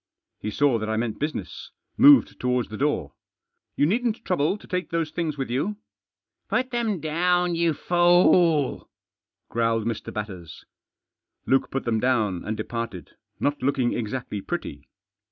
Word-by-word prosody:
He 105 - -4
saw 130 +1 +2
that 110 0 -4
I 110 - 0
meant 115 -1 -2
business; 150 +2 -4 0.3
moved 285 0 +6
towards 125 -1 0
the 110 - -7
door. 130 - -1 0.3
" - - -56
You - - +4
needn't 230 +6 0
trouble 175 +1 +1
to - - -16
take 180 0 -3
those 165 -2 -1
things 160 -2 -2
with 135 -3 -3
you." 155 +12 -1 0.7
Put 255 0 0
them 230 -6 -1
down, 175 +3 +1
you 165 -2 +1
fool," 175 -4 +3 0.6
growled 115 -1 0
Mr. 115 -2 -3
Batters. 95 -7 -7 0.8
Luke 135 0 +2
put 135 - -3
them 115 -2 +1
down, 110 -8 +1
and 110 0 -3
departed, 115 -8 -5 0.3
not 145 -2 -1
looking 130 -2 +1
exactly 115 -2 -4
pretty. 70 -5 -6
135 Hz, 150 wpm, -25 LUFS, 115-175 Hz, 0.8 s, moved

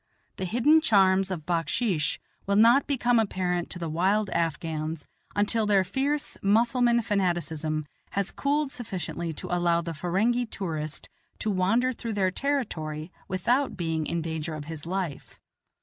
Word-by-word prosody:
The 190 - -2
hidden 245 - +4
charms 195 -7 +4
of 170 -5 -4
backsheesh 170 - 0 0.3
will 200 - +2
not 235 +6 +6
become 245 -4 +2
apparent 180 -5 -1
to - - -6
the 170 -1 -4
wild 190 +6 +1
Afghans 160 -2 -2 0.3
until 210 +1 +2
their 200 -2 +4
fierce 275 +10 -1
Mussulman 235 +3 +3
fanaticism 170 -6 -1 0.2
has 200 -1 -1
cooled 285 0 0
sufficiently 185 -8 -4
to 175 - -3
allow 170 -1 +2
the 170 -1 -5
Ferenghi 205 +10 +1
tourist 155 -7 -3 0.3
to 215 - -1
wander 225 +7 +2
through 230 -1 -5
their 190 -2 +1
territory 175 - -2 0.2
without 245 +9 +1
being 160 -3 -1
in 170 -1 -1
danger 160 -1 -3
of 150 -1 -7
his 160 0 -7
life. 180 -6 -4
185 Hz, 145 wpm, -27 LUFS, 165-230 Hz, 0.3 s, not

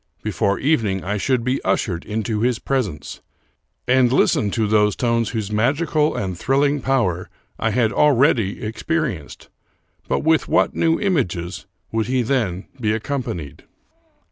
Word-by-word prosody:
Before 100 -1 0
evening 115 - 0
I 105 +3 -2
should 125 +3 0
be 130 +3 -1
ushered 90 -5 -1
into 110 0 -2
his 120 0 +1
presence, 110 - -3 0.7
and 125 -1 +4
listen 110 -5 +2
to 110 +2 0
those 105 -1 +3
tones 115 -2 0
whose 110 -3 -3
magical 150 +7 +1
and 95 -2 -3
thrilling 140 - +1
power 115 -10 0 0.3
I 115 - +1
had 110 0 +1
already 130 -8 +3
experienced. 115 - -3 0.6
But - - 0
with 160 0 +2
what 165 - +2
new 165 0 +1
images 95 - -1 0.2
would 110 -1 -1
he 130 0 +1
then 110 -7 -1
be 110 -3 +1
accompanied? 110 - -4
115 Hz, 140 wpm, -21 LUFS, 100-135 Hz, 0.7 s, and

